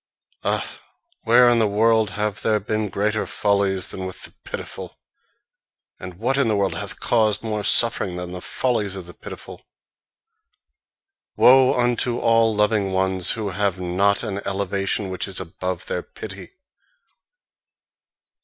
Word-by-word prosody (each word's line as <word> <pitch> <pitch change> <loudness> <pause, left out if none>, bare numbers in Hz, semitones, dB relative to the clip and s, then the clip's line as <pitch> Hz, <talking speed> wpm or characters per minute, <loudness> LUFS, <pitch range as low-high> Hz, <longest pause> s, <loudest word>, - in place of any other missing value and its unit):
Ah, - - 0 0.6
where 120 +2 +6
in 120 -1 +4
the 110 - +3
world 110 +1 +2
have 105 -1 -2
there 110 -1 +2
been 105 +1 -2
greater 105 +2 -1
follies 100 -2 0
than 95 -1 -5
with 95 - -10
the - - -9
pitiful? - - -7 1.0
And 90 -1 -8
what 125 +8 0
in 135 - +2
the 110 - +1
world 100 -1 0
hath - - -5
caused 110 -3 +1
more 105 -2 -2
suffering 100 -4 +3
than 90 0 -6
the 90 0 -7
follies 105 -5 -1
of 95 -2 -7
the 85 - -12
pitiful? - - -10 1.7
Woe 130 0 +6
unto 120 0 +1
all 115 -2 +3
loving 105 -2 +1
ones 95 -1 +2
who 110 -3 -3
have 100 -1 -1
not 95 +3 +1
an 100 -1 -3
elevation 100 0 -2
which 95 - -3
is 95 - -1
above 90 +1 -5
their 90 - -3
pity! 95 -2 -9
100 Hz, 145 wpm, -22 LUFS, 95-110 Hz, 1.7 s, where